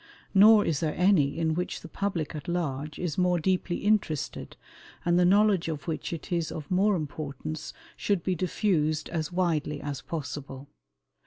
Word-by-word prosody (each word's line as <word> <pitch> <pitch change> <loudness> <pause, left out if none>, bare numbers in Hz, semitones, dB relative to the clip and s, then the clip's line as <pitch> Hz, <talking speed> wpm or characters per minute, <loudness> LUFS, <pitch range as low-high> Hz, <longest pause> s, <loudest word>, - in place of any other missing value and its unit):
Nor 210 +1 +7
is 155 -4 0
there 155 -2 -1
any 180 -7 +3
in 160 -1 +1
which 180 +2 -3
the - - -9
public 175 -4 -3
at 150 -2 -7
large 150 -4 -2
is 175 -2 -3
more 180 -1 +3
deeply 180 +1 0
interested, 205 -9 0 0.5
and 175 0 +3
the 180 - +5
knowledge 200 -1 +4
of 155 -1 -5
which 160 - -3
it 165 +2 -6
is 170 -2 0
of 155 0 -7
more 195 +3 +3
importance 155 -1 -5 0.2
should 200 -5 0
be 185 - 0
diffused 160 -4 0
as 160 -2 -3
widely 165 -5 0
as 140 -3 -5
possible. 140 -3 -6
165 Hz, 165 wpm, -28 LUFS, 150-185 Hz, 0.5 s, Nor